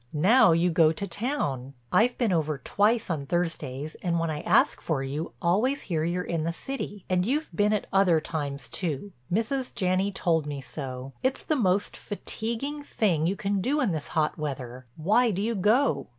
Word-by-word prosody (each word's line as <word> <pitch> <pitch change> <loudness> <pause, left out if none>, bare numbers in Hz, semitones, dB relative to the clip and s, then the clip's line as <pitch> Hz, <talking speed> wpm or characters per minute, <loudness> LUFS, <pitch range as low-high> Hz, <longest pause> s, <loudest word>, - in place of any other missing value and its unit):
Now 190 - +5
you 170 +2 +3
go 160 -1 +5
to 200 +5 -3
town. 160 - -3 0.2
I've 240 +3 +3
been 235 -5 +1
over 155 -3 0
twice 210 - +1
on 140 -4 -3
Thursdays 155 -4 -2
and 170 -1 0
when 165 -1 0
I 150 -1 -4
ask - - +3
for 145 -5 -1
you, 145 +5 -4
always 215 +11 +2
hear 160 -4 -1
you're 175 +2 -1
in 165 -3 -2
the 165 - 0
city. 210 -1 -6
And 180 -1 +2
you've 290 +9 -1
been 210 0 +3
at 210 - 0
other 190 -4 +5
times 145 -3 -4
too—Mrs. 200 - -3
Janney 185 +2 +1
told 165 -5 0
me 145 -1 -4
so. 135 -1 -6
It's 260 +1 0
the 310 - 0
most 200 -5 +1
fatiguing 235 +7 -4
thing 180 - +1
you 190 - 0
can 200 0 -1
do 280 +8 +1
in 250 -9 +2
this 155 -3 -3
hot 155 0 0
weather. 130 -4 -5
Why 215 +10 +3
do 195 -3 -2
you 230 +2 0
go?" 210 - +2
180 Hz, 185 wpm, -27 LUFS, 155-215 Hz, 0.2 s, Now